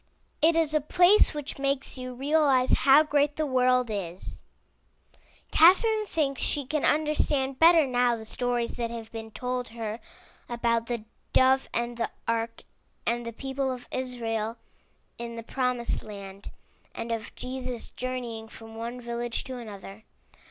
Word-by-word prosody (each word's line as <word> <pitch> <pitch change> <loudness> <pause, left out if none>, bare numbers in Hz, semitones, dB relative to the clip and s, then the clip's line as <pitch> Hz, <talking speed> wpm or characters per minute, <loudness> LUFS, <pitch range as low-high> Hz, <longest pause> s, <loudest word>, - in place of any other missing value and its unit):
It 325 +2 +5
is 320 -2 +2
a 305 - +3
place 355 +5 +5
which 290 -2 -5
makes 275 -1 +1
you 255 -1 -6
realize 275 -1 +3
how 275 +3 +6
great 295 -1 +1
the 310 - 0
world 250 -3 +2
is. 185 -3 -5 1.1
Catherine 425 +6 +5
thinks - - -10
MY 315 - +5
BOOK 275 -1 -2
HOUSE - - +4
she 290 -2 +1
can 300 +2 -1
understand 290 -3 +1
better 330 -1 +7
now 245 -2 +2
the 220 -1 -8
stories 245 +1 -1
that 235 -1 -2
have 230 -1 -7
been 225 -1 -7
told 250 +2 -3
her 225 -1 -5 0.5
about 235 -1 0
the 235 -3 -3 0.3
dove 265 +1 +4
and 235 0 -2
the 230 - -1 0.2
ark 230 0 -2 0.4
and 235 0 -1
the - - -3
people 270 +2 -2
of 245 -1 -7
Israel 230 -3 -2 0.6
in 235 0 -5
the 230 - -6
promised 250 -1 -1
land, 200 -2 -9 0.5
and 230 - -4
of 225 -1 -4
Jesus 255 -1 -4
journeying 245 -3 -5
from 225 0 -12
one 235 +2 -5
village 235 -1 -3
to 255 -1 -7
another. 205 -2 -10
250 Hz, 160 wpm, -27 LUFS, 230-275 Hz, 1.1 s, better